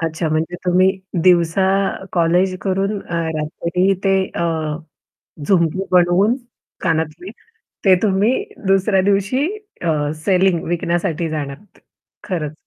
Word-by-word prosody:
अच्छा. 165 0 -2
म्हणजे 160 +3 -1
तुम्ही 185 +1 +4 0.3
दिवसा 175 +1 +3 0.2
अ, - - -6
कॉलेज 180 +2 +2
करून 195 +2 -1
अ, 175 - -7 0.2
रात्री 170 +5 0
ते 195 0 +3 0.2
अ, 170 - -1 1.0
झुमकी 185 0 +2
बनवून 180 +6 +4 0.4
कानातले 165 +1 -2 0.6
ते 190 -1 +7
तुम्ही 205 +2 +2 0.4
दुसऱ्या 195 0 +3
दिवशी 200 +8 +1 0.4
अ, 150 -3 0
सेलिंग 185 -3 +2
विकण्यासाठी 170 -1 -1
जाणार 145 -3 -4
होते, 205 -1 -25 0.4
खरंच 160 -6 -3
180 Hz, 115 wpm, -19 LUFS, 165-195 Hz, 1.0 s, ते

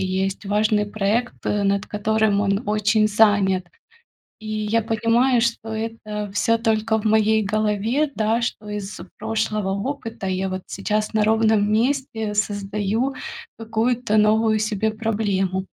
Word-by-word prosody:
есть 190 +2 -2
важный 210 +1 +2
проект, 215 +4 -1
над 200 -1 0
которым 215 -1 +1
он 200 +2 0
очень 215 +1 +2
занят. 205 -4 +3 0.7
И 215 - -10
я 215 +1 0
понимаю, 230 +3 +2
что 230 -1 -1
это 220 -2 -4
всё 230 +2 +2
только 220 -1 +1
в 210 - -8
моей 220 0 +3
голове, 215 +7 0
да 220 +2 +1
что 215 -3 -4
из 210 -2 -5 0.2
прошлого 215 -2 -1
опыта 225 0 -4
я 190 +1 -1
вот 185 0 -5
сейчас 210 +3 -2
на 215 -1 +2
ровном 220 -1 +3
месте 225 -2 0
создаю 205 +4 -1 0.4
какую-то 225 0 -1
новую 215 +1 +3
себе 215 0 0
проблему. 205 -4 -1
215 Hz, 130 wpm, -22 LUFS, 205-225 Hz, 0.7 s, занят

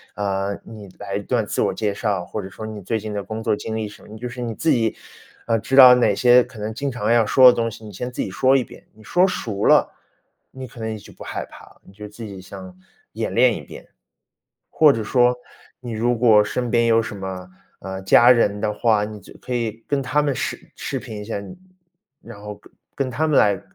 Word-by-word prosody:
嗯， 100 0 -2
“你 105 -3 -11
来 100 - -5
一 - - -4
段 115 0 0
自 - - -2
我 - - +1
介 105 -2 -2
绍”， 100 -3 -2
或 105 +4 -5
者 95 - -8
说 110 - -9
“你 110 -1 -7
最 110 +4 -2
近 105 0 -6
的 100 -1 -3
工 110 +2 -6
作 110 -2 +1
经 110 +1 -6
历” 110 -1 -3
什 105 - -15
么。 - - -16
你 110 - -10
就 120 +3 -5
是 125 +1 -8
你 115 -2 -3
自 165 - -1
己， 115 -2 +1 0.5
呃， 115 -1 +2
知 120 +5 -2
道 130 -2 +10
哪 120 -5 +2
些 125 +2 +5
可 120 - -15
能 105 +1 -4
经 140 +5 -3
常 115 -3 -1
要 120 -1 +5
说 130 +4 +5
的 - - -4
东 115 0 -1
西， 110 0 -12
你 105 - -9
先 125 +6 -6
自 - - -4
己 - - -5
说 130 +7 +3
一 130 - 0
遍。 - - -16
你 110 - -18
说 180 - +3
熟 110 - -3
了， - - +4 0.6
你 130 0 -8
可 120 - -15
能 110 0 -3
也 110 - -5
就 100 - -14
不 - - -12
害 - - -5
怕 - - -15
了， - - -21
你 95 - -17
就 105 +1 -9
自 110 +2 -9
己 100 -3 -9
像 95 -1 -11 0.4
演 - - -3
练 - - +4
一 - - -7
遍。 - - -12 0.8
或 155 -2 +5
者 115 - -3
说， 125 +3 +3 0.5
你 120 -2 -7
如 120 +2 0
果 110 -3 +5
身 120 +3 -3
边 120 -1 +3
有 115 0 +4
什 110 - -7
么， 95 -1 -6 0.3
呃， 95 0 -6
家 120 +5 +6
人 105 -4 +2
的 105 -1 -1
话， 105 -1 +2
你 105 0 -9
就 - - -16
可 125 - -6
以 115 -1 -4
跟 140 -1 0
他 135 +3 +1
们 140 -2 -1
视 - - -3 0.2
视 - - -4
频 110 -4 -8
一 - - -8
下， 110 -1 -4
你 100 - -10 0.7
然 100 - -12
后 105 0 -7
跟 - - -21 0.2
跟 135 -2 -2
他 155 +6 0
们 150 - +2
来 100 -2 +2
110 Hz, 270 characters per minute, -21 LUFS, 105-125 Hz, 0.8 s, 道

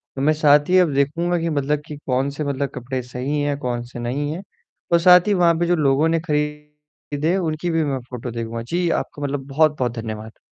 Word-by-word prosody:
तो 135 - -3
मैं 155 +3 +4
साथ 150 0 +4
ही 185 - +5
अब 170 -5 +3
देखूँगा 165 +6 +1
कि, 165 0 -1
मतलब 145 -1 0
कि 150 - -7
कौन 130 +1 0
से 145 +2 -4
मतलब 140 -1 -2
कपड़े 130 +1 -4
सही 125 +4 -3
हैं, 145 -1 0
कौन 125 -3 -2
से 120 0 -10
नहीं 135 +5 -2
हैं 165 +4 -5 0.5
और 170 - +6
साथ 180 +2 +6
ही 205 - +3
वहाँ 175 -3 +4
पे 175 - +2
जो 175 - +3
लोगों 145 0 +2
ने 165 0 +2
खरीदे 150 +1 -3
उनकी 165 -1 -2
भी 165 -1 +1
मैं 140 -3 -1
फोटो 125 0 -6
देखूँगा, 115 0 -4
जी 170 +9 -1
आपका 145 -3 -3
मतलब 140 -1 -3
बहुत-बहुत 145 -3 +2
धन्यवाद। 110 -1 -7
145 Hz, 215 wpm, -21 LUFS, 130-160 Hz, 0.5 s, और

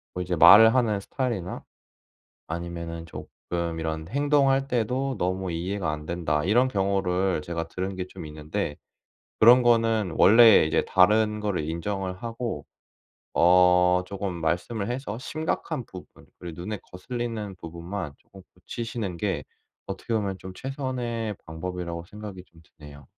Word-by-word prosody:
뭐 90 - -2
이제 90 0 -2
말을 105 +8 +9
하는 110 -5 +2
스타일이나 110 -5 -4 0.8
아니면은 85 0 -6
쪼끔 85 0 -5
이런 80 0 -3
행동할 140 +1 +2
때도 125 +2 -1
"너무 95 0 -2
이해가 90 +1 -2
안 75 0 -6
된다." 80 -3 -1
이런 115 +8 +3
경우를 95 -5 0
제가 85 +1 -4
들은 95 +2 -4
게 90 - -4
좀 85 -3 -9
있는데 75 +2 -4 0.7
그런 120 +3 +8
거는 115 -5 +2
원래 110 -3 +7
이제 80 - +1
다른 105 +3 +3
거를 100 -7 -2
인정을 95 +3 -4
하고 115 - -4 0.7
어 90 +1 +5
쪼금 100 0 -4
말씀을 90 +7 -2
해서 125 -4 -4
심각한 155 +4 -3
부분 - - -13
그리고 85 -1 -8
눈에 105 +2 -4
거슬리는 110 +1 -5
부분만 85 -1 -6
쪼금 95 -1 -17
고치시는 110 0 -5
게 100 +2 -2 0.4
어떻게 100 +4 -5
보면 100 -4 -1
좀 95 0 -9
최선의 125 -6 -3
방법이라고 85 +1 -5
생각이 105 0 -9
좀 80 -1 -20 0.2
드네요. 70 -2 -13
95 Hz, 305 characters per minute, -26 LUFS, 85-115 Hz, 0.8 s, 말을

